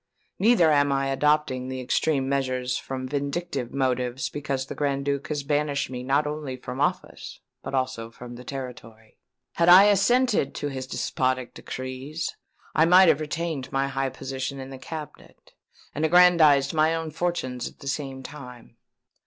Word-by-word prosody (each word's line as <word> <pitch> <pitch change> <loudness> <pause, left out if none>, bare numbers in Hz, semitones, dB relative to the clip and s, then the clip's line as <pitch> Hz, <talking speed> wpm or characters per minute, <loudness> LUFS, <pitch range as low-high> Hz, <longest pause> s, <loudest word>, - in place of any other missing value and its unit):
Neither 195 -7 +5
am 145 -1 +3
I 135 0 0
adopting 135 -2 +1
extreme 130 +2 0
measures 130 -2 -1
from 130 -1 -5
vindictive 140 -1 -3
motives 130 -1 -1
because 140 -3 -3
the - - -7
Grand 140 -1 -1
Duke 140 -1 -1
has 145 -2 -3
banished 145 -1 -1
me 125 -1 -5
not 135 +4 +1
only 150 -3 -4
from 125 +2 -6
office 145 - -2 0.2
but - - -4
also 130 -3 -2
from 120 +1 -11
the 120 +1 -10
territory. 120 -5 -9 0.4
Had 170 +1 +4
I 185 +3 +10
assented 210 - +3
to 145 - -3
his 130 -1 -5
despotic 130 -1 -1
decrees 130 +5 -5 0.4
I 160 - +4
might 180 +1 +7
have 145 - +3
retained 155 -3 -3
my 135 0 0
high 135 0 -1
position 135 +1 -5
in 135 0 -8
the 135 - -9
cabinet, 155 0 -10 0.4
and 150 - -3
aggrandized 160 -5 +5
my 160 +1 +3
own 165 -1 -4
fortunes 150 -7 -2
at - - -22
the 140 - -11
same 135 -2 -4
time. 125 -5 -11
140 Hz, 160 wpm, -25 LUFS, 130-155 Hz, 0.4 s, I